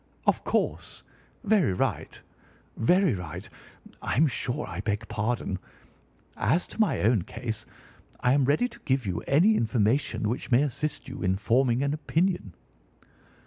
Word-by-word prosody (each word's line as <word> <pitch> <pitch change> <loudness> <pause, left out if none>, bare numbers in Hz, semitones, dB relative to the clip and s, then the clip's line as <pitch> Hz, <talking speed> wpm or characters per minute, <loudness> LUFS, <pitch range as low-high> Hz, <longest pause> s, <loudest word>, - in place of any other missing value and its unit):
"Of - - +2
course! - - -2 0.4
Very 205 - +3
right! - - -2 0.6
very 180 - +3
right! 90 +2 -6 0.5
I'm 155 - +2
sure 135 +1 -2
I 90 +1 -5
beg 105 +1 -2
pardon. 105 -3 -2 0.8
As 175 - +1
to - - -2
my 205 -6 +2
own 110 -1 +3
case, 110 +4 -5 0.5
I 125 +1 +3
am 140 -1 +3
ready 150 - +2
to 235 -1 -15
give 130 - 0
you 90 -3 -2
any 180 +11 +5
information 110 - +1
which 115 - -3
may 125 +3 +5
assist 150 +2 -3
you 135 0 -7
in 95 -1 +2
forming 120 +5 +2
an 140 +1 0
opinion." 155 - -1
125 Hz, 145 wpm, -27 LUFS, 105-150 Hz, 0.8 s, any